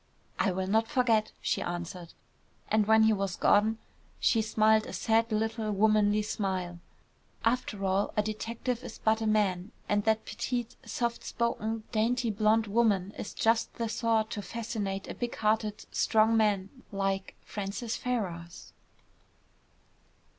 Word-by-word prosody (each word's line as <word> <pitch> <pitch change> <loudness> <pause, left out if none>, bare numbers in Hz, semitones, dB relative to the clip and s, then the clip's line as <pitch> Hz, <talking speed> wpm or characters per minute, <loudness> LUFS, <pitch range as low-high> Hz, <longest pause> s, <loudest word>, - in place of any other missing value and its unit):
"I 195 - +2
will 190 +1 -2
not 220 +4 +2
forget," 235 -5 +2
she - - 0
answered. 175 0 -5 0.6
And 215 -1 +2
when 220 0 +6
he 220 0 +5
was 195 -3 -2
gone 215 +2 +3 0.4
she 225 - +3
smiled 220 0 +3
a - - -7
sad 225 +1 +1
little 220 0 -1
womanly 210 0 +3
smile. 185 -4 -3 0.7
"After 230 -4 0
all, 195 +1 +1
a 210 - +4
detective 230 +3 -3
is - - -8
but 220 0 +1
a 220 - 0
man, 205 -3 +1 0.2
and 205 0 +1
that 220 0 +2
petite, 240 -2 -3
soft 235 -1 -2
spoken, 225 -1 -2
dainty 235 +1 +1
blonde 215 +2 +3
woman 205 -3 +1
is - - -6
just 225 0 +1
the 230 - -2
sort 220 -1 +1
to 210 - -3
fascinate 205 -3 -4
a - - -5
big 240 -1 -4
hearted, 215 0 0
strong 220 +1 +3
man 205 -3 +2 0.2
like 195 -1 -2
Francis 210 +3 -4
Ferrars." 180 -9 -4
215 Hz, 140 wpm, -29 LUFS, 200-225 Hz, 0.7 s, when